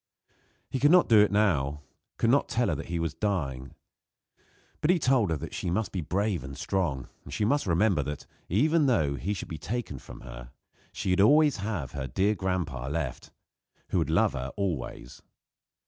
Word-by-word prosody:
He 130 - -1
could 145 +3 +5
not 180 +1 +6
do 110 -2 +7
it 105 -1 +5
now 75 -9 +1 0.3
could - - +2
not - - +2
tell - - +1
her - - +1
that - - -5
he 85 +1 -2
was 80 -2 -2
dying; 70 - -3 1.1
but 150 - +1
he 180 - +5
told 130 - +2
her 80 -2 -1
she - - -3
must 105 +5 -1
be 95 - -2
brave 95 0 -1
and 70 +1 -8
strong; 75 -7 -1 0.2
and - - -11
she 105 - 0
must 140 +1 +1
remember 90 -1 +3
that, 75 +1 -5 0.2
even 150 - +3
though 80 - +2
he 95 +9 -3
should 90 - -6
be 80 -4 -6
taken 115 - -4
from - - -12
her, - - -10 0.4
she 90 - 0
would 145 +10 +5
have 95 - -3
her 70 -2 -4
dear 95 - +1
grandpa 90 -10 -2
left, 70 -3 -4 0.6
who - - +1
would - - 0
love - - +3
her 65 +2 -4
always. 80 -10 -4
90 Hz, 185 wpm, -28 LUFS, 70-105 Hz, 1.1 s, do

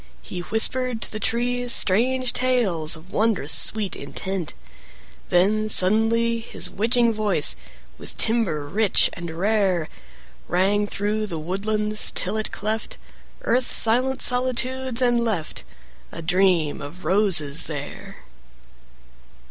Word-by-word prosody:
He 180 - -7
whispered 225 +5 0
to - - -7
the 215 - -5
trees 245 +2 -1
strange 250 +6 +3
tales 195 -12 +1
Of 165 +4 -15
wondrous 215 -9 0
sweet 215 -3 +5
intent, 190 -4 -4 0.7
When, 215 +4 +1
suddenly, 225 +4 +2
his 225 - -2
witching 235 +2 +1
voice 205 -8 +2 0.4
With - - -9
timbre 205 -11 0
rich 205 +6 +1
and 170 -1 -7
rare, 185 -1 0 0.6
Rang 200 +3 +1
through 210 +2 -2
the 170 -5 -5
woodlands 210 +6 -1
till 195 +3 0
it 215 0 -3
cleft 215 +1 -4 0.5
Earth's 250 +1 +1
silent 255 +4 +3
solitudes, 255 0 +1
and 240 -1 +2
left 190 - -3 0.5
A 165 - -8
Dream 175 -3 +1
of 170 +6 -10
Roses 175 -8 +1
there! 145 -3 -8
215 Hz, 115 wpm, -22 LUFS, 180-235 Hz, 0.7 s, sweet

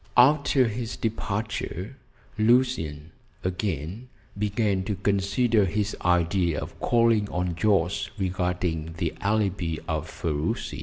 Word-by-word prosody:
After 135 0 +5
his 115 +1 -4
departure, 110 0 -3 0.4
Lucian 110 - +2 0.3
again 90 - -3 0.3
began 105 -1 0
to 105 - -1
consider 100 +3 +2
his 105 +3 -1
idea 85 -1 +2
of - - -8
calling 115 -3 +3
on 90 0 -1
Jorce 95 +1 +1
regarding 90 -4 -1
the 85 -2 -1
alibi 100 -5 0
of 80 0 -2
Ferruci. 75 -3 -2
100 Hz, 105 wpm, -26 LUFS, 85-110 Hz, 0.4 s, After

